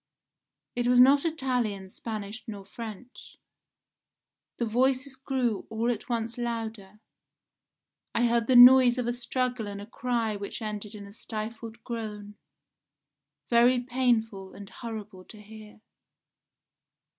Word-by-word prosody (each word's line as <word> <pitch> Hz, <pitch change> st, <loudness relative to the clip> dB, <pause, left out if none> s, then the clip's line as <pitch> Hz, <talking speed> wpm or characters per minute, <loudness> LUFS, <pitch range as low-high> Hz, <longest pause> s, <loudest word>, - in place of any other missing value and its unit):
It 245 Hz, 0 st, 0 dB
was 245 Hz, 0 st, +5 dB
not 275 Hz, +4 st, +6 dB
Italian, 245 Hz, -, -2 dB
Spanish, 215 Hz, 0 st, -6 dB
nor 205 Hz, -3 st, -7 dB
French. 230 Hz, +3 st, -10 dB, 1.2 s
The 235 Hz, -, 0 dB
voices 260 Hz, +4 st, +1 dB
grew 260 Hz, -5 st, -2 dB
all 230 Hz, +2 st, 0 dB
at 230 Hz, +1 st, -6 dB
once 230 Hz, 0 st, -2 dB
louder; 225 Hz, -4 st, -5 dB, 1.2 s
I 240 Hz, -, +3 dB
heard 235 Hz, -1 st, +1 dB
the 255 Hz, -, +3 dB
noise 250 Hz, 0 st, +9 dB
of 250 Hz, -, -1 dB
a 240 Hz, -, 0 dB
struggle 245 Hz, -1 st, -2 dB
and 200 Hz, 0 st, -6 dB
a 205 Hz, -, -8 dB
cry 230 Hz, -1 st, -2 dB
which 200 Hz, +2 st, -6 dB
ended 215 Hz, -1 st, -5 dB
in 205 Hz, -1 st, -9 dB
a 200 Hz, -, -13 dB
stifled 225 Hz, +1 st, -7 dB
groan, 210 Hz, -3 st, -6 dB, 1.2 s
very 240 Hz, +2 st, +5 dB
painful 235 Hz, -6 st, 0 dB
and 200 Hz, 0 st, -11 dB
horrible 215 Hz, -5 st, -8 dB
to 215 Hz, -, -14 dB
hear. 215 Hz, 0 st, -13 dB
230 Hz, 125 wpm, -28 LUFS, 210-245 Hz, 1.2 s, noise